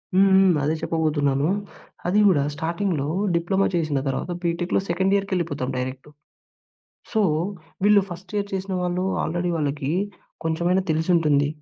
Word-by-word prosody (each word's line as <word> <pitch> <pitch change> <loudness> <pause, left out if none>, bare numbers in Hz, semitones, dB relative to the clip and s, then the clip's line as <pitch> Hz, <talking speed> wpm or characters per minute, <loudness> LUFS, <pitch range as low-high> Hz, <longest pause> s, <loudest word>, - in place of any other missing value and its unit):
హ్మ్. 195 +1 +6
హ్మ్. 190 -1 +6
అదే 155 +3 +1
చెప్పబోతున్నాను. 150 -3 +1 0.6
అది 195 +4 +3
గూడా 145 -7 +4
స్టార్టింగ్‌లో 165 -2 -1 0.3
డిప్లొమా 190 +4 +1
చేసిన 155 -5 0
తర్వాత 135 +6 -2
బీటెక్‌లో 170 +1 0
సెకండ్ 190 +3 +1
ఇయర్‌కి 200 0 -1
వెళ్ళిపోతాం 145 -7 -2
డైరెక్టు. 130 +3 -5 1.0
సో 220 - +2 0.6
వీళ్ళు 205 -1 +6
ఫస్ట్ 180 +2 -9
ఇయర్ 200 0 -1
చేసిన 190 0 -3
వాళ్ళు 180 +1 -1 0.2
ఆల్రెడీ 175 +2 -1
వాళ్ళకి 145 -1 -1 0.5
కొంచెమైనా 170 +3 +1
తెలిసుంటుంది. 155 -3 +2
170 Hz, 130 wpm, -23 LUFS, 150-190 Hz, 1.0 s, హ్మ్